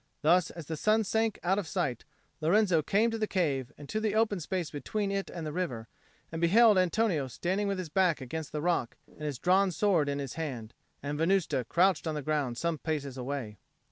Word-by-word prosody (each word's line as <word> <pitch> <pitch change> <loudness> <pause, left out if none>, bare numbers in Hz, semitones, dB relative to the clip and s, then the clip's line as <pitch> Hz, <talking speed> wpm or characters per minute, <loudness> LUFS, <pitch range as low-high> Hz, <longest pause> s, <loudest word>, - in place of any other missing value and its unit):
Thus, 175 +3 +4
as 165 -3 -9
the 160 - -4
sun 215 +6 +3
sank 220 +1 0
out 190 +3 +2
of 190 - -4
sight, 140 - -2 0.4
Lorenzo 180 0 +3
came 215 +9 +2
to 225 - -3
the 215 - 0
cave 140 -11 -1
and 145 - -10
to 215 - -1
the 215 -1 -1
open 220 -3 +2
space 175 0 -3
between 200 +7 -2
it 195 0 -2
and 170 -3 -6
the 150 - -4
river, 130 -11 -3 0.4
and 165 0 -4
beheld 210 +4 +6
Antonio 180 -5 +1
standing 190 - -1
with 200 -1 -1
his 185 -3 -5
back 175 -1 +2
against 145 +4 -6
the 150 0 -3
rock 170 -9 0
and - - -19
his 150 -3 -3
drawn 190 +6 +3
sword 175 -5 +2
in 140 - -1
his 140 -3 -4
hand, 130 -9 -5 0.3
and 145 +1 -3
Venusta 165 -7 +1
crouched 180 +6 +2
on 155 - -1
the 150 - -4
ground 140 -5 -1
some 170 +2 -1
paces 145 -5 -3
away. 125 -5 -5
170 Hz, 210 wpm, -30 LUFS, 145-195 Hz, 0.4 s, beheld